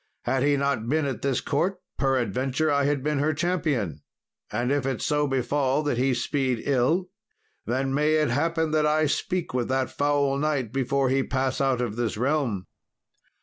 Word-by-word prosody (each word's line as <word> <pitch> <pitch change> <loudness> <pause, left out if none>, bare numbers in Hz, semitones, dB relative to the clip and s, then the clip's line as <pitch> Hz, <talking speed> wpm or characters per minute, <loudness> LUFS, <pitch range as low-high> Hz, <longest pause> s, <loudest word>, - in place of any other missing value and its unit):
Had 130 - 0
he 145 +1 +3
not 140 -5 -1
been 155 +1 +1
at 135 - -3
this 135 -3 0
court, 175 +7 -1 0.2
peradventure 135 +3 +1
I 140 -1 +2
had 145 -2 0
been 150 -1 0
her 155 +2 +1
champion. 145 - -1 0.5
And 120 +4 -1
if 145 -2 +1
it 130 -3 -2
so 150 0 +1
befall 135 +2 0
that 145 -5 0
he 130 0 +2
speed 130 -2 -1
ill, 145 +7 +1 0.6
then 135 +3 0
may 150 +2 +2
it 155 -4 +2
happen 160 +4 0
that 155 -1 +2
I 155 +1 +3
speak 170 +3 -1
with 125 -2 0
that 130 0 0
foul 140 -1 +1
knight 145 -7 -1
before 135 0 +1
he 135 +1 +2
pass 130 0 -1
out 135 -3 +1
of 115 -3 -3
this 120 -3 -1
realm." 125 -7 0
135 Hz, 180 wpm, -26 LUFS, 130-150 Hz, 0.6 s, he